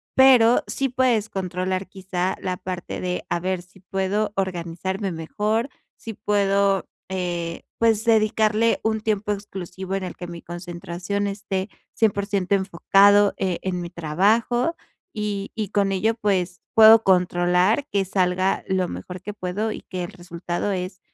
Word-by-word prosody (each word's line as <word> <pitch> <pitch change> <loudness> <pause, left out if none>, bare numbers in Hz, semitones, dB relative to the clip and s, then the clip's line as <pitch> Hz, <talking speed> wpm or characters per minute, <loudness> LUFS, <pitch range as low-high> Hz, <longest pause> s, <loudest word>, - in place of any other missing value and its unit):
pero 250 -3 +6
sí 275 -1 -1
puedes 245 -4 +1
controlar, 185 0 -2
quizá, 185 -1 -3
la 185 -1 -2
parte 180 -1 -5
de 180 0 -3
a - - 0
ver 185 0 -2
si 180 +2 -20
puedo 195 +3 -1
organizarme 190 +1 -3
mejor, 210 - -1 0.3
si 225 - -8
puedo, 200 -2 +1 0.2
eh, 175 -3 -3 0.2
pues, 225 -2 +2
dedicarle 220 0 +2
un 220 0 +1
tiempo 210 -1 -1
exclusivo 190 -2 -5
en 195 - -2
el 180 - -5
que 175 - -7
mi 170 -1 -8
concentración 175 +3 -4
esté 195 -1 -3 0.2
100% 200 -3 +1
enfocado, 195 +2 +4
eh, 185 -3 -1
en 185 -1 -2
mi 170 - -5
trabajo. 215 - +1 0.4
Y 205 -2 -3
y 215 -3 -3
con 200 -1 +1
ello, 220 +4 +1
pues, 185 -6 -1
puedo 220 0 +9
controlar 180 +6 +2
que 200 -6 0
salga 185 0 0
lo 185 -2 0
mejor 180 0 -7
que 210 +2 -6
puedo, 205 +3 -3
y - - -6
que 185 -1 -5
el 175 - -6
resultado 175 +1 -4
es 185 0 -4
195 Hz, 150 wpm, -23 LUFS, 180-210 Hz, 0.4 s, puedo